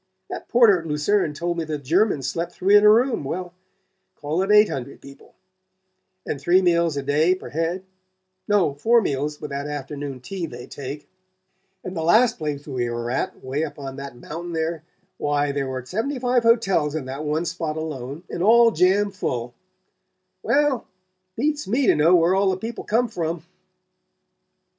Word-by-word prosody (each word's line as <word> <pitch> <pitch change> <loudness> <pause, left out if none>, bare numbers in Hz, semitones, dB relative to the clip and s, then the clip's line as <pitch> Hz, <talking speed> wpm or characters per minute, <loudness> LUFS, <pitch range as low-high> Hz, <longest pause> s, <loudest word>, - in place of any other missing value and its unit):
That - - -6
porter 230 -6 +5
at 165 - -8
Lucerne 150 +2 0
told 170 +2 -2
me - - -1
the 155 -1 -3
Germans 150 - +1
slept 170 +5 -3
three 195 +2 +3
in 205 - +7
a 210 - +8
room 235 - +3
well, 175 +5 -5 0.6
call 155 +4 -2
it 195 - -1
eight 210 0 +7
hundred 135 +1 -6
people; 140 0 -15 0.9
and 140 - -4
three 175 +5 +4
meals 170 -4 +2
a 140 - -2
day 155 +6 +2
per 185 - -10
head; 165 +4 -2 0.6
no, 205 -8 +2
four 230 +12 +3
meals, 150 -5 -2
with 150 - -7
that 140 +1 -4
afternoon 145 -1 -5
tea 170 +7 -5
they 120 -3 -9
take; 140 +2 -8 0.8
and 185 - -6
the 165 - -2
last 220 +9 +4
place 145 -2 -4
we 125 -4 -2
were 120 0 -3
at 130 - -3
'way 135 +4 -2
up 150 -2 -6
on 135 -2 -7
that 140 -2 -7
mountain 170 +7 -7
there 160 0 -2 0.4
why, 145 0 0
there 140 -1 -2
were 130 -1 -5
seventy 225 - -2
five 250 0 +2
hotels 195 -10 +2
in 155 -4 -3
that 135 +3 -5
one 155 +3 -1
spot 160 -2 -3
alone, 150 -1 -5
and - - -5
all 230 +4 +6
jam 200 +1 +2
full 125 -11 -3 0.9
well, 290 -2 +2 0.6
it - - -3
beats 295 +1 0
me 250 +7 +1
to - - +5
know 160 +4 +5
where 170 +1 +4
all 195 0 +3
the 185 - 0
people 225 +4 -6
come 235 +3 +1
from..." 165 -6 -4
165 Hz, 180 wpm, -23 LUFS, 145-195 Hz, 0.9 s, a